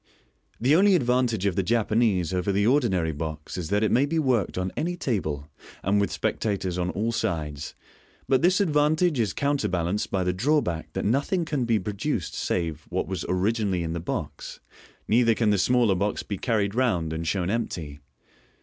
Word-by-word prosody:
The 130 +6 +4
only 195 +2 +5
advantage 125 - +1
of 100 -3 +1
the 95 - +2
Japanese 105 -4 +1
over 90 +2 0
the 100 +1 +1
ordinary 110 - +2
box 75 0 -6
is 85 -4 -4
that 105 +1 +1
it 110 - +2
may 135 +4 +3
be 165 +3 -1
worked 125 - +1
on 90 0 -1
any 175 +2 -2
table, 80 - -2 0.4
and 100 +2 +2
with 100 - 0
spectators 95 -4 -2
on 90 0 0
all 110 +5 -1
sides, 75 -10 -3 0.5
but 130 0 +3
this 180 +2 +4
advantage 155 -3 +2
is 110 -4 +1
counterbalanced 100 - -1
by 95 -2 0
the 90 0 0
drawback 110 - 0
that - - -2
nothing 145 - +1
can 145 -6 -1
be 115 -2 +2
produced 105 - -3
save 85 -4 -2
what - - -2
was 95 -3 -4
originally 95 -1 0
in 80 0 -3
the 85 - -3
box, 85 - -5 0.5
neither 115 0 +4
can 110 -2 +2
the 100 - +2
smaller 120 +1 +3
box 100 +3 -1
be 100 -3 -5
carried 105 -4 0
round, 105 -11 0
and 80 +1 -4
shown 90 +1 0
empty. 80 -10 -3
105 Hz, 180 wpm, -26 LUFS, 90-125 Hz, 0.5 s, only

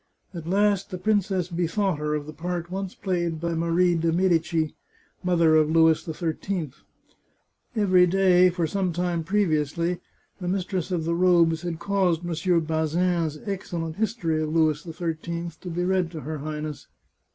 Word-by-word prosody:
At 165 -3 -7
last 200 0 +2
the 185 - -5
princess 195 -2 +1
bethought 175 0 0
her 150 0 -1
of 150 -1 -3
the 155 - -8
part 175 +2 -4
once 195 0 -4
played 175 -4 -2
by 170 +1 -2
Marie 170 +2 +2
de 165 0 +1
Medicis, 165 -3 +1 0.5
mother 170 -3 +4
of 155 -1 +4
Louis 160 0 +4
XIII. 165 0 -3 1.0
Every 185 -4 +4
day, 185 0 +5
for 175 -1 -1
some 185 +1 -1
time 175 -1 -1
previously, 170 -2 0 0.4
the 180 - -5
mistress 185 -1 -2
of 175 -4 -1
the 170 - 0
robes 170 -2 +3
had 175 -2 -4
caused 180 -1 +1
Mons. 170 -2 -3
Bazin's 165 -1 +1
excellent 170 -5 -4
History 190 -8 0
of 155 -1 -2
Louis 155 -2 +2
XIII 170 +1 -4
to 180 - -6
be 175 +1 -2
read 185 -2 +1
to 155 - -6
her 155 0 -5
Highness. 150 0 -5
170 Hz, 155 wpm, -25 LUFS, 160-185 Hz, 1.0 s, day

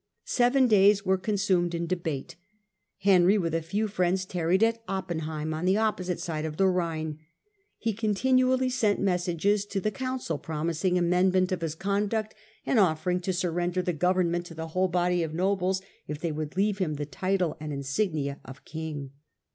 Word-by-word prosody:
Seven 255 +2 +3
days 205 -2 +5
were 190 0 +2
consumed 190 -4 +1
in 170 0 -2
debate. 165 -6 -3 0.7
Henry, 190 0 +5
with 165 -4 -1
a 165 - +1
few 200 +7 -1
friends, 185 -2 0
tarried 180 +2 +1
at 230 0 +2
Oppenheim, 160 -5 -3
on 160 +3 -3
the 190 +2 +3
opposite 185 -5 0
side 165 -3 -3
of 155 -1 -4
the 195 - +3
Rhine. 160 -4 -1 0.6
He 225 -1 -1
continually 255 +5 +2
sent 220 -5 +1
messages 185 +2 +1
to 200 - -2
the 215 +3 -1
council, 255 - -3
promising 165 +3 -1
amendment 180 +1 +2
of 185 -2 -1
his 160 -2 -2
conduct, 205 +4 -1 0.3
and 245 - +2
offering 180 -1 +2
to 180 +1 -2
surrender 175 0 -1
the 180 - -1
goveniment 175 +1 +1
to 165 - -11
the 160 0 -5
whole 185 +3 +1
body 180 0 +1
of 160 -1 -3
nobles, 190 +1 0 0.2
if 150 -1 -5
they 170 0 -2
would 155 +2 -5
leave 205 +1 +1
him 160 -5 0
the 145 0 -3
title 185 +2 -1
and 150 0 -5
insignia 140 0 -2 0.3
king. 155 -4 -6
180 Hz, 170 wpm, -27 LUFS, 165-200 Hz, 0.7 s, days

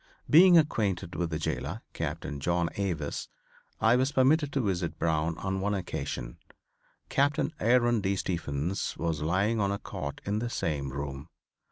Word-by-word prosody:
Being 175 +3 +8
acquainted 100 - +1
with 85 -2 -1
the 80 - -2
jailor, 80 - -3
Captain 75 -2 -4
John 85 +2 0
Avis, 85 -7 -3 0.5
I 110 +2 +5
was 130 +2 +2
permitted 145 +2 +3
to 135 - +1
visit 90 -6 -1
Brown 80 0 0
on 95 0 -2
one 100 +1 0
occasion. 75 -9 -4 0.7
Captain 145 +3 +1
Aaron 120 -1 +3
D. 100 0 0
Stephens 85 -1 -2
was 80 -3 -1
lying 95 +8 +1
on 100 -1 +1
a 100 - -1
cot 70 -6 -6
in 105 +2 0
the 120 +1 -2
same 75 - -2
room. 70 +1 -5
95 Hz, 155 wpm, -29 LUFS, 80-120 Hz, 0.7 s, Being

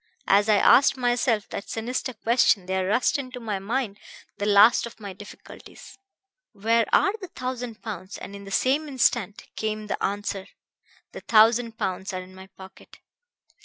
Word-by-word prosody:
As 205 +2 +4
I 215 - +5
asked 265 +6 +5
myself 240 -3 0
that - - -7
sinister 250 +3 -3
question 225 -4 +2
there 190 0 -1
rushed 240 +7 +1
into 255 -2 -7
my 215 -4 -3
mind 215 0 -3 0.4
the 205 - -1
last 210 +4 +5
of 235 - -14
my 200 -3 -7
difficulties: 205 +2 -13 0.6
'Where 225 +3 +1
are 395 - +3
the 375 - -6
thousand 250 -6 -6
pounds?' 195 -3 -7
And 200 - -9
in 200 - -10
the - - -9
same 270 +9 +1
instant 240 -5 0
came 215 -1 -3
the 210 - -4
answer: 200 -1 -3 0.6
'The - - -8
thousand 225 +1 +3
pounds 190 +1 -3
are 185 - -4
in 185 +1 -15
my 190 0 -12
pocket.' 190 0 -15
215 Hz, 165 wpm, -25 LUFS, 200-245 Hz, 0.6 s, I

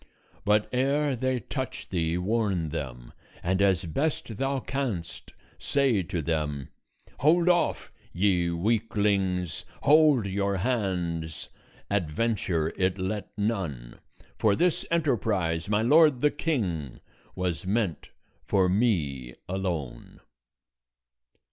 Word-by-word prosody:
But 105 0 +3
ere 140 +2 +1
they 130 0 -1
touch 130 +4 -5
thee 85 -2 0
warn 95 -4 0
them, - - -6 0.3
and 95 +2 +1
as 95 -3 +3
best 120 - -2
thou 135 +2 0
canst, 95 - -4 0.3
say 135 -8 +2
to 85 -1 -3
them: 75 -4 -2 0.5
'Hold 165 +5 +4
off! 175 -1 +2 0.2
ye 90 -2 +2
weaklings; 100 -3 0 0.2
hold 150 -5 +5
your 100 0 -1
hands! 90 -8 -2 0.4
Adventure 90 -3 0
it 95 0 +1
let 95 +2 -3
none, 95 - -3 0.4
For 105 -2 +3
this 175 - +1
enterprise, 105 - 0
my 105 +1 +2
lord 150 0 +5
the 150 - +4
King, 95 - -2 0.4
Was 90 -1 -2
meant 100 -6 -1 0.3
for 95 -2 +2
me 80 - 0
alone.' 85 -10 -4
100 Hz, 105 wpm, -27 LUFS, 85-120 Hz, 0.5 s, hold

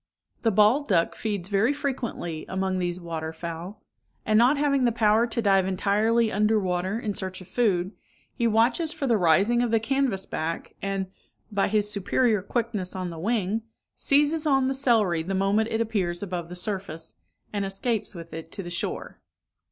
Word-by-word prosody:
The 230 - +3
bald 215 +8 +4
duck 170 -5 +2
feeds 205 -5 -3
very 205 +5 +2
frequently 240 - -3
among 190 0 -1
these 175 0 -2
water 165 -2 -4
fowl; 170 +5 -7 0.4
and 215 - +2
not 245 +6 +5
having 280 -3 +2
the 240 - +3
power 220 0 +3
to 235 0 -2
dive 195 -2 +4
entirely 215 +4 +2
under 210 +2 +2
water 185 +2 -1
in 215 -3 -2
search 185 -1 -4
of 185 - -12
food, 195 -3 +1 0.4
he 235 -3 +1
watches 235 +9 +2
for 285 - -3
the 240 -3 +3
rising 200 +6 +3
of 245 - +1
the 225 0 +3
canvass 240 -5 0
back, 165 +1 -4
and, 195 -1 -1 0.5
by 200 -1 +1
his 210 0 +1
superior 215 +2 +1
quickness 210 -3 -2
on 185 -2 -3
the 165 - -8
wing, 215 +2 0 0.3
seizes 295 +3 +2
on 270 -2 +3
the - - 0
celery 225 -11 +2
the 190 +4 -3
moment 200 +4 +2
it 225 0 0
appears 195 -6 -1
above 175 -3 -4
the 180 - -7
surface, 180 -4 -4 0.4
and 205 -1 -1
escapes 200 +2 -2
with 165 -1 -9
it 160 +1 -7
to 195 - -5
the 175 - -7
shore. 170 - -4
205 Hz, 180 wpm, -26 LUFS, 185-230 Hz, 0.5 s, not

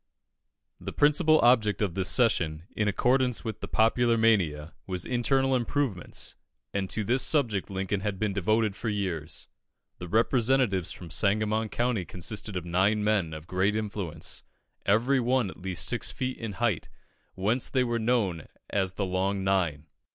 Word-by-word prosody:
The - - -6
principal 155 +2 +4
object 115 -4 +4
of 100 -5 0
this 95 0 0
session, 85 -10 +1
in 105 - 0
accordance 125 +3 +1
with 110 -2 -4
the - - -6
popular 115 +1 +3
mania, 85 -9 +2
was 90 -2 -3
internal 135 +2 +1
improvements, 125 -6 -2 0.4
and 95 -2 -2
to 110 - 0
this 125 +6 +2
subject 115 - +1
Lincoln 95 +1 -2
had 100 -1 -3
been 105 0 -1
devoted 105 +2 +1
for 115 - -3
years. 90 -7 -3 0.5
The 90 - -6
representatives 115 -2 +2
from 85 -3 -9
Sangamon 110 +3 +1
County 120 -4 0
consisted 100 +4 -5
of 90 -2 -3
nine 95 +5 +2
men 105 -6 +1
of 80 0 -8
great 95 +4 +1
influence, 100 -7 -3 0.4
every 120 +7 +3
one 125 -4 +1
at - - -15
least 95 -2 -1
six - - 0
feet 130 0 -3
in 110 -3 -4
height, 110 -7 -1 0.5
whence 110 +7 0
they 130 -2 +2
were 120 -1 -1
known 110 -9 0 0.2
as 95 -2 0
the 100 0 -2
Long 95 +1 -1
Nine. 85 -6 0
105 Hz, 160 wpm, -28 LUFS, 95-120 Hz, 0.5 s, principal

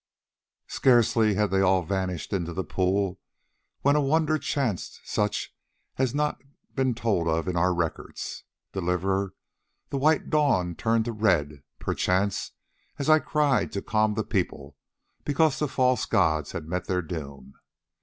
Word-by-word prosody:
Scarcely 115 -4 +3
had 105 -1 +1
they 95 0 +3
all 95 -1 +3
vanished 95 -1 -3
into 85 -3 -2
the 95 - -2
pool 95 0 0 0.6
when 140 +1 +3
a 150 - +3
wonder 155 +2 +2
chanced 130 - -2
such 105 -1 -2 0.4
as 130 - +2
has 120 - -7
not 150 0 0 0.3
been 130 -3 +1
told 105 -8 0
of 80 +1 0
in 90 - -1
our 90 +2 +3
records: 85 -2 -4 0.3
Deliverer, 95 +1 -1 0.6
the 140 - -1
white 155 +2 +2
dawn 135 - +2
turned 115 +5 +1
to 120 - -2
red, 85 -10 +1 0.2
perchance, 95 +2 -1 0.4
as 140 +2 +1
I 155 - +7
cried 150 -3 +1
to 100 - -3
calm 110 -1 +1
the 110 - 0
people, 75 -9 -3 0.5
because 150 0 +2
the 150 - +1
false 130 -3 +1
gods 80 -8 +1
had - - -5
met 90 +2 -3
their 90 -1 0
doom." 70 -5 -7
100 Hz, 150 wpm, -26 LUFS, 90-130 Hz, 0.6 s, I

